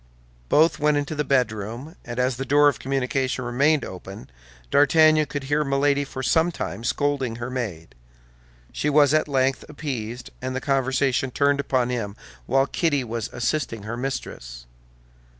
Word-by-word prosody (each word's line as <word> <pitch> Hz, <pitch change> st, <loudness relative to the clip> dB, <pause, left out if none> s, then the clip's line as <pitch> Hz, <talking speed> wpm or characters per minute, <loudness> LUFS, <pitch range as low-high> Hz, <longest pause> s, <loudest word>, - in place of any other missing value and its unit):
Both 160 Hz, +1 st, +4 dB
went 150 Hz, 0 st, +3 dB
into 145 Hz, +2 st, -2 dB
the 150 Hz, -1 st, -1 dB
bedroom, 125 Hz, -, -1 dB
and 120 Hz, 0 st, -7 dB
as 125 Hz, -1 st, +1 dB
the 135 Hz, -, -3 dB
door 145 Hz, +2 st, +4 dB
of 145 Hz, -, +1 dB
communication 130 Hz, -1 st, -1 dB
remained 140 Hz, +5 st, +2 dB
open, 95 Hz, -7 st, -9 dB, 0.4 s
D'Artagnan 155 Hz, +1 st, +5 dB
could 145 Hz, -1 st, -4 dB
hear 145 Hz, +2 st, +1 dB
Milady 140 Hz, 0 st, +1 dB
for 130 Hz, -1 st, -6 dB
some 165 Hz, +5 st, +3 dB
time 115 Hz, -, -5 dB
scolding 135 Hz, -2 st, 0 dB
her 120 Hz, +2 st, -5 dB
maid. 95 Hz, -, -5 dB, 0.8 s
She 150 Hz, -, -1 dB
was 145 Hz, -1 st, +5 dB
at 155 Hz, 0 st, +2 dB
length 135 Hz, -1 st, +1 dB
appeased, 125 Hz, -5 st, -5 dB
and 130 Hz, 0 st, -3 dB
the -, -, 0 dB
conversation 135 Hz, -1 st, +1 dB
turned 140 Hz, +2 st, +2 dB
upon 130 Hz, -3 st, 0 dB
him 105 Hz, -5 st, -3 dB, 0.3 s
while 135 Hz, 0 st, +3 dB
Kitty 145 Hz, -2 st, 0 dB
was 115 Hz, -2 st, -4 dB
assisting 120 Hz, -3 st, -2 dB
her 110 Hz, +3 st, -4 dB
mistress. -, -, -5 dB
135 Hz, 155 wpm, -24 LUFS, 120-145 Hz, 0.8 s, D'Artagnan